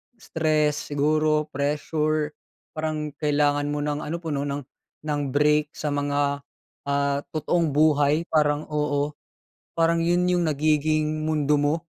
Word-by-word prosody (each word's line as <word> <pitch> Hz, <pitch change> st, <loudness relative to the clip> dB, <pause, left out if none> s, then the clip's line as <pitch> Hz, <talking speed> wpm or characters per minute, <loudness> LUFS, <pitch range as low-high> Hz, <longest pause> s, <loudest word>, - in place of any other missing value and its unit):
stress 155 Hz, -7 st, 0 dB
siguro, 155 Hz, +1 st, +1 dB
pressure, 150 Hz, +2 st, -1 dB, 0.4 s
parang 155 Hz, -1 st, -3 dB
kailangan 145 Hz, -1 st, +1 dB
mo 145 Hz, 0 st, -2 dB
ng 150 Hz, 0 st, -1 dB
ano, 155 Hz, +2 st, -4 dB
puno 145 Hz, -3 st, -2 dB
ng 140 Hz, 0 st, -3 dB, 0.4 s
ng 150 Hz, -1 st, -1 dB
break 150 Hz, +2 st, +2 dB
sa 150 Hz, -1 st, -3 dB
mga 145 Hz, 0 st, 0 dB, 0.5 s
ah, 140 Hz, 0 st, +1 dB, 0.2 s
totoong 165 Hz, +2 st, +1 dB
buhay 150 Hz, +1 st, +3 dB
parang, 150 Hz, -1 st, +2 dB
oo. 150 Hz, -1 st, 0 dB, 0.6 s
Parang 165 Hz, 0 st, +2 dB
'yun 175 Hz, +2 st, +2 dB
'yung 175 Hz, -2 st, +1 dB
nagiging 155 Hz, +1 st, +1 dB
mundo 150 Hz, -1 st, +2 dB
mo, 145 Hz, +2 st, +2 dB
150 Hz, 125 wpm, -24 LUFS, 145-155 Hz, 0.6 s, buhay